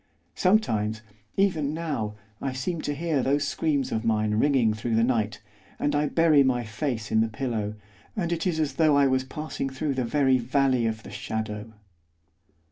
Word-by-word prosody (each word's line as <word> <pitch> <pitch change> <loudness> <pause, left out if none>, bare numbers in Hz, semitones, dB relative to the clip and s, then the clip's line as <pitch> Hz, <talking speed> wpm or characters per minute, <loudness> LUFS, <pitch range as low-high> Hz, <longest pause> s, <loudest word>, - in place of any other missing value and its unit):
Sometimes, 110 - +1 0.3
even 160 -7 +1
now, 145 -11 -3 0.3
I 135 - -2
seem 155 +6 -3
to 145 - -2
hear 160 -2 0
those 140 +3 +1
screams 145 -2 0
of 110 - -1
mine 110 -2 +1
ringing 120 -1 +3
through 110 +2 -2
the 115 - +4
night, 115 -4 0 0.3
and 145 - 0
I 150 0 +2
bury 160 -2 +4
my 130 -3 +2
face 115 -1 -3
in 110 - +4
the 115 - +2
pillow, 110 -2 -3 0.4
and 175 -5 -1
it 170 +2 0
is 165 -3 0
as 155 -2 0
though 155 -3 +4
I 140 - +5
was 130 -1 +2
passing 150 0 -4
through 135 +2 -2
the 130 -1 -1
very 130 +1 +3
Valley 130 -1 +2
of 110 0 -3
the - - -10
Shadow. 110 0 -4
130 Hz, 180 wpm, -26 LUFS, 110-150 Hz, 0.4 s, I